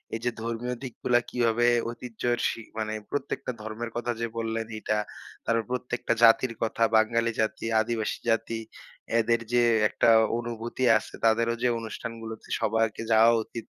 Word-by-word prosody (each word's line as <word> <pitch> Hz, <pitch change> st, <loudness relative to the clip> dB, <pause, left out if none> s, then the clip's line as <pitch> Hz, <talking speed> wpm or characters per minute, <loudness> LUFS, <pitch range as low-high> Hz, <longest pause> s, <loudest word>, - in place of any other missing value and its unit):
এইযে 120 Hz, +2 st, -1 dB
ধর্মীয় 115 Hz, +2 st, -3 dB
দিকগুলা 125 Hz, -1 st, +1 dB
কিভাবে 120 Hz, 0 st, +1 dB, 0.2 s
ঐতিহ্যের 120 Hz, 0 st, -3 dB
সি -, -, -5 dB, 0.2 s
মানে 110 Hz, 0 st, -2 dB, 0.2 s
প্রত্যেকটা 140 Hz, -2 st, -3 dB
ধর্মের 110 Hz, +2 st, -5 dB
কথা 120 Hz, 0 st, -1 dB
যে, 115 Hz, -, -1 dB
বললেন, 115 Hz, 0 st, -2 dB
এটা। 105 Hz, 0 st, 0 dB, 0.5 s
তারপর 115 Hz, 0 st, +1 dB
প্রত্যেকটা 125 Hz, -1 st, -1 dB
জাতির 115 Hz, +1 st, +6 dB
কথা, 115 Hz, +1 st, 0 dB
বাঙালি 115 Hz, +1 st, +3 dB
জাতি, 110 Hz, +1 st, -2 dB, 0.2 s
আদিবাসী 110 Hz, -1 st, -2 dB
জাতি 115 Hz, 0 st, 0 dB, 0.6 s
এদের 115 Hz, +1 st, +2 dB
যে, 120 Hz, 0 st, +5 dB, 0.3 s
একটা -, -, +2 dB, 0.3 s
অনুভূতি 120 Hz, +1 st, -4 dB
আছে -, -, -8 dB
তাদেরও 115 Hz, +1 st, +3 dB
যে, -, -, +4 dB
অনুষ্ঠানগুলোতে 115 Hz, 0 st, -7 dB
সবাইকে 110 Hz, 0 st, 0 dB
যাওয়া 115 Hz, +1 st, +6 dB
উচিত। 115 Hz, 0 st, -8 dB
115 Hz, 140 wpm, -27 LUFS, 110-120 Hz, 0.6 s, জাতির